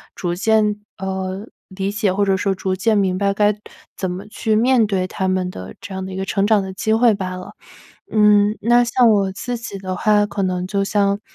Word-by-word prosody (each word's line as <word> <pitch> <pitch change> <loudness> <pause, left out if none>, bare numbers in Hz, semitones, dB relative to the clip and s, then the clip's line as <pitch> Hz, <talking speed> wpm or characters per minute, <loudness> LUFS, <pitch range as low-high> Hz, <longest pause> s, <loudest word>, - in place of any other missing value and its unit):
逐 175 -1 -2
渐， 210 +1 +2 0.2
呃， 190 +2 -4 0.2
理 195 0 -3
解， 205 -2 0
或 200 +2 +1
者 195 -1 +2
说 195 0 0
逐 190 0 -2
渐 220 +4 +1
明 190 -2 +1
白 200 0 +1
该 210 0 +1 0.4
怎 185 -2 -2
么 190 +3 -7
去 215 +1 -1
面 240 +1 +4
对 190 -3 -1
他 190 0 -3
们 185 -1 0
的 95 - -8
这 - - -9
样 190 0 -4
的 190 - -7
一 - - -6
个 190 - -2
成 195 +1 0
长 210 -1 +3
的 190 0 -6
机 220 +3 -1
会 230 0 +4
罢 190 -2 -4
了。 185 0 -9 0.6
嗯， 210 0 +4
那 240 +1 +4
像 240 0 +3
我 200 -3 +2
自 245 +5 -4
己 205 -4 -7
的 185 -1 -4
话， 210 +2 +3
可 200 -1 -3
能 180 -1 -1
就 200 0 0
像， 200 0 +1
200 Hz, 240 characters per minute, -20 LUFS, 190-215 Hz, 0.6 s, 面